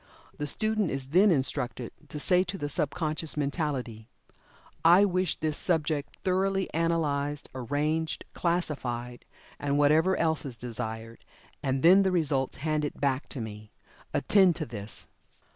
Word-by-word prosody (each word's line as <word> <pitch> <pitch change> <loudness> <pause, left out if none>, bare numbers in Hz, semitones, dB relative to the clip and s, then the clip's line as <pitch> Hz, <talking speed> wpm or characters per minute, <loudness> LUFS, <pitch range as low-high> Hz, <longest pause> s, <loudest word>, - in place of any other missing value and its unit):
The 150 - -4
student 215 +3 +1
is 135 -1 -4
then 185 +7 +5
instructed 130 -5 0 0.2
to 150 - -5
say 180 +4 +3
to 190 +2 -5
the 145 -5 -3
sub 150 0 0
conscious 155 -1 -2
mentality: 140 -7 -2 0.8
"I 175 +5 +7
wish 185 -3 0
this 155 -1 -2
subject 155 -4 -1
thoroughly 190 +1 0
analyzed, 150 -3 0
arranged, 150 +5 -1
classified 130 -8 -2 0.3
(and 145 0 0
whatever 155 +6 +4
else 160 -2 +1
is 130 -5 -5
desired) 115 -1 -6 0.4
and 135 -2 -1
then 185 +4 +8
the 190 -1 +2
results 145 -6 0
handed 150 -2 -1
back 140 -1 0
to 130 - -5
me. 105 -1 -8 0.4
Attend 190 -4 +4
to - - -3
this." 105 -2 -6
150 Hz, 140 wpm, -28 LUFS, 130-170 Hz, 0.8 s, then